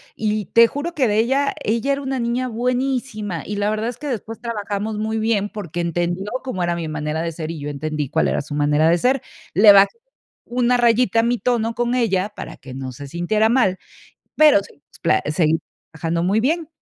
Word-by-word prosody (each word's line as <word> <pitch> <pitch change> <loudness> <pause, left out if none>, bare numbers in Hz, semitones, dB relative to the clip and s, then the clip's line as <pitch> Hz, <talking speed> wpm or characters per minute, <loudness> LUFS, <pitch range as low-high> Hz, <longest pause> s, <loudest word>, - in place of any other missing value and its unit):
Y 215 -1 -1
te 230 +4 +6
juro 290 +7 -4
que 270 -7 +2
de 210 -1 +1
ella 265 +5 +2
ella 230 +5 0
era 280 - -3
una 265 -1 -2
niña 240 +2 -1
buenísima, 245 -5 -2
y 210 - -4
la 205 0 0
verdad 215 +2 -1
es 245 - -7
que 300 - -9
después 225 -3 -4
trabajamos 210 -2 -3
muy 220 +1 -1
bien, 215 -2 0
porque 175 -5 -5
entendió 175 +3 -2
cómo 255 -9 -4
era 175 0 0
mi 170 -2 -4
manera 155 +1 -3
de 170 - -2
ser, 160 -1 -6
y 165 -2 -5
yo 145 - -5
entendí 150 0 -3
cuál - - +1
era - - 0
su 145 - -8
manera 150 +2 +2
de 170 +1 +4
ser. 260 +4 +2 0.3
Le 205 +2 +8
bajé 200 - +5 0.5
una 245 0 +1
rayita 230 -2 +3
a - - -3
mi 240 0 +1
tono 230 -2 0
con 240 +1 -1
ella, 205 -5 +1
para - - -7
que 130 -2 -11
no 130 -1 -5
se 140 +3 -9
sintiera 195 +8 +1
mal, 230 -7 +2 0.6
pero 300 -9 +6
si - - -16
nos 145 - -23
pla 110 - +2
seguimos 160 +1 +1 0.3
trabajando 165 +1 -2
muy 195 +4 +2
bien. 315 +6 0
215 Hz, 215 wpm, -21 LUFS, 170-240 Hz, 0.6 s, Le